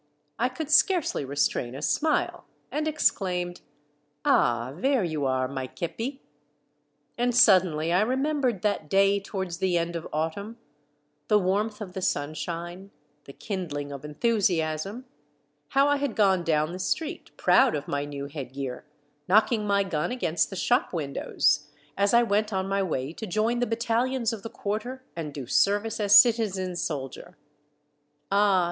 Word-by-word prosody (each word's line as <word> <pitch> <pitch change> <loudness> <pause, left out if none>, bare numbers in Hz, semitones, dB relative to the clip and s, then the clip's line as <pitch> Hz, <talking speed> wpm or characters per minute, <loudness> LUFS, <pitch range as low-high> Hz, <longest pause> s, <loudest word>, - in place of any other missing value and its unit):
I - - +2
could 315 -2 -6
scarcely 340 - +3
restrain 135 -3 -1
a 140 - -7
smile, 310 - 0 0.3
and 305 +1 -1
exclaimed, 180 - 0 0.2
— 145 0 -42
" 145 0 -47
Ah! 120 +2 +2
There 260 - +1
you 155 -5 -1
are, 130 0 0
my 130 -1 -5
kepi." 230 - -5 1.0
And 245 0 +1
suddenly 180 -8 +4
I 180 - +4
remembered 260 -2 0
that 205 -7 -1
day 195 +2 +4
towards 190 -4 -5
the 185 -2 +1
end 170 0 -2
of 165 - -5
autumn, 180 +9 -3 0.7
the 210 - +4
warmth 210 +3 0
of 190 -4 -7
the 190 - -5
sunshine, 170 +5 -3 0.4
the 140 - -11
kindhng 145 -9 -5
of 140 0 -8
enthusiasm, 180 - -1 0.3
— 145 0 -45
how 275 +1 +5
I 290 0 +3
had 280 -5 -2
gone 190 -4 +3
down 155 -1 +1
the 180 - -6
street, 320 - -3
proud 260 -2 +4
of 145 - -4
my 145 0 -1
new 140 -1 -6
head 140 -3 -7
gear, 135 0 -5 0.4
knocking 215 +2 +3
my 200 0 +3
gun 175 -3 -2
against 170 -10 0
the 195 - -7
shop 245 +6 +1
windows, 150 -1 0 0.3
as 200 +1 +2
I 235 0 +5
went 215 -1 0
on 190 -1 -1
my 195 0 0
way 155 -6 -2
to 220 - -7
join 220 +6 0
the 245 - 0
battalions 230 +1 0
of 220 - -6
the 225 - -7
Quarter 240 +7 -4
and 160 -3 -5
do 140 -2 -7
service 205 - +1
as 205 -1 +8
citizen 200 -6 +2
soldier! 140 -5 -5 0.9
Ah 200 -1 +4
190 Hz, 160 wpm, -26 LUFS, 150-225 Hz, 1.0 s, as